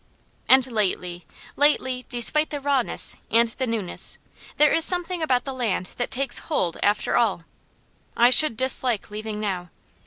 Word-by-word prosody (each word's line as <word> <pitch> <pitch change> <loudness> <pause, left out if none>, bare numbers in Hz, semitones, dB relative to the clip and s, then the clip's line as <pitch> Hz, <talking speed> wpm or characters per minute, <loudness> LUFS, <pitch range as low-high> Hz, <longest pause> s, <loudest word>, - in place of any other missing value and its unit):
And 260 -1 +6
lately 180 - -3 0.3
lately, 260 -3 0
despite 270 +5 +1
the 290 - -5
rawness, 275 -3 0
and 230 +1 +2
the 260 +3 -5
newness, 220 -6 -2 0.4
there 300 0 +4
is 325 - +5
something 355 0 +2
about 255 -6 0
the 270 - -5
land 220 -8 -3
that 245 - -3
takes 270 +1 -1
hold, 180 - -1
after 205 +1 0
all. 215 -8 0 0.7
I 240 +1 +4
should 280 -4 +6
dislike 255 -4 +1
leaving 215 0 -6
now! 185 -4 -4
245 Hz, 150 wpm, -23 LUFS, 210-275 Hz, 0.7 s, And